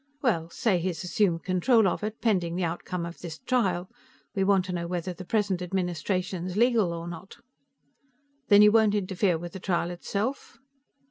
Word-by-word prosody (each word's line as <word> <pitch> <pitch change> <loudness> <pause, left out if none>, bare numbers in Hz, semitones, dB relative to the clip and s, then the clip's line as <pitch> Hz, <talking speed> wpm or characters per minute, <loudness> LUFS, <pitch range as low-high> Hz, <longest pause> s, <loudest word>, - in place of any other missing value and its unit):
"Well, 170 -10 +1
say 195 0 +1
he's 180 0 -3
assumed 180 -3 +1
control 205 +4 +3
of 180 - -2
it, 215 +1 -4
pending 180 -7 +1
the 185 - -1
outcome 170 +1 -3
of 170 0 -8
this 165 -2 -7
trial. 190 -8 0 0.5
We 195 -3 +1
want 190 -1 +3
to 185 - -5
know 170 -1 -3
whether 180 +1 -3
the 185 +2 -9
present 195 -3 0
administration's 180 +1 -2
legal 230 -6 +3
or 170 0 -5
not." 175 +3 -9 1.1
"Then 205 0 +7
you 210 - +7
won't 215 -2 +4
interfere 190 -2 +1
with 175 +1 -8
the 190 - -6
trial 175 -2 -1
itself?" 205 +9 -4
185 Hz, 175 wpm, -27 LUFS, 175-205 Hz, 1.1 s, Then